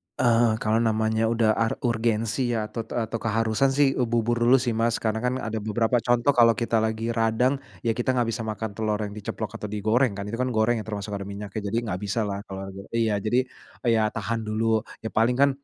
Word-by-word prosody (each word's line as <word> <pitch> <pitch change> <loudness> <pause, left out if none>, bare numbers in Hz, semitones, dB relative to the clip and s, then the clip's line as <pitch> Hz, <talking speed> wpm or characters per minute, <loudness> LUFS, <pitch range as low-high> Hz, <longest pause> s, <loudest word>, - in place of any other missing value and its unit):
eee, 115 -2 +3
kalau 110 0 +1
namanya 110 0 +1
udah 115 -1 +3
ar 115 +1 0
urgensi 115 +1 0
ya 110 - 0
atau 115 -2 -5
t - - -7
atau 115 -1 -2
keharusan 115 +4 +1
sih 140 -1 +4
u 125 - +2
bubur 120 0 +1
dulu 120 +2 +5
sih 125 -2 +1
Mas, 115 +1 +1
karena 110 0 0
kan 125 +2 0
ada 110 -4 -3
beberapa 110 +3 +1
contoh 120 +3 +2
kalau 115 -3 +5
kita 115 -1 +1
lagi 110 +1 -1
radang, 115 +4 +1 0.2
ya 115 - +2
kita 125 +3 0
nggak 120 -2 +1
bisa 115 0 -4
makan 110 0 -3
telur 105 +1 -1
yang 105 - -4
diceplok 105 +1 -5
atau 105 - -4
digoreng 110 +3 +1
kan 100 - -4
itu 115 - -4
kan 130 - +1
goreng 115 -1 +1
ya - - -5
termasuk 105 -1 -5
ada 100 -1 -4
minyaknya 100 +1 -6
jadi 110 +3 -1
nggak 90 - -2
bisalah 100 -1 -1
kalau 95 0 -6
lagi 95 - -10 0.2
iya 110 -3 +1
jadi, 115 +5 +1 0.4
eee, 120 - +3
ya 110 - +3
tahan 115 0 -2
dulu, 110 +1 +1 0.2
ya 110 - -4
paling 115 +3 +2
kan, 140 +2 +5
115 Hz, 225 wpm, -25 LUFS, 110-120 Hz, 0.4 s, dulu